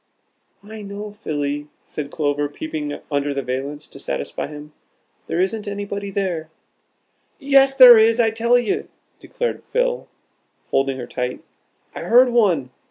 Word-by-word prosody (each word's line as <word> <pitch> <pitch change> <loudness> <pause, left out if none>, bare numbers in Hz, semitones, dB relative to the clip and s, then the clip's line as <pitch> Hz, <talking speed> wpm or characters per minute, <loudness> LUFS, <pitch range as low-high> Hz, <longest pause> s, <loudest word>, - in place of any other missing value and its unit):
"Why 215 +1 -10
no, 205 +1 -7
Philly!" 145 -7 -3 0.2
said 145 -2 -6
Clover, 145 -1 -1
peeping 150 0 -5
under 145 0 0
the 140 - -2
valance 140 +4 -4
to - - -11
satisfy - - -4
him; 150 0 -11 0.5
"there 165 - -2
isn't 205 +3 -1
anybody 200 0 -4
there." 185 -5 -2 0.9
"Yes, 275 -2 +4
there 250 -4 +10
is, 225 +2 +4
I 225 -2 +4
tell 235 +2 +3
you," 385 +11 -1 0.3
declared 485 - -4
Phil, - - 0 0.6
holding 135 0 +1
her 125 - -5
tight. 125 0 -4 0.5
"I - - -7
heard 250 +2 +5
one. 185 - +2
195 Hz, 140 wpm, -21 LUFS, 145-230 Hz, 0.9 s, there